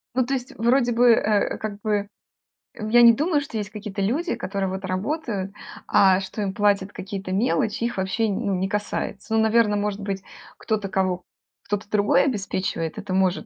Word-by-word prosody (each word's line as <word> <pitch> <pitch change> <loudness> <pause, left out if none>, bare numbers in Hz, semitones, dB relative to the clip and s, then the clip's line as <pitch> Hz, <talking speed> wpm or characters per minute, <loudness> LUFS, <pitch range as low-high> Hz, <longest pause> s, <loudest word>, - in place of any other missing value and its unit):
Ну, 255 -1 +2
то 270 - -2
есть 255 -1 -4
вроде 240 +2 +3
бы, 240 +1 +5
э, 210 -2 +2
как 205 -2 -5
бы, 205 -1 0 0.7
э, 215 -1 -5
я 240 +2 +6
не 235 -1 +9
думаю, 300 +4 +1
что 275 -5 -6
есть 205 -1 -3
какие-то 210 -1 -6
люди, 285 - 0
которые 195 0 -3
вот 190 +1 -5
работают, 200 - -2 0.4
а 190 -1 +5
что 195 +2 -5
им 195 -2 -2
платят 200 -1 +1
какие-то 190 0 -6
мелочи, 225 +2 0
их 240 -1 -2
вообще, 190 +4 0
не 200 - -2
ну, 195 - +1
не 185 +1 -1
касается. 210 +2 -3
Ну, 220 - +4
наверно, 220 -1 +3
может 205 0 -1
быть, 195 -1 -3 0.4
кто-то, 210 -3 -2
кого 185 -2 0 0.4
кто-то 205 0 -3
другой 205 -1 +3
обеспечивает, 190 - -2
это 200 -2 -5
может 190 -1 +1
205 Hz, 185 wpm, -24 LUFS, 195-230 Hz, 0.7 s, не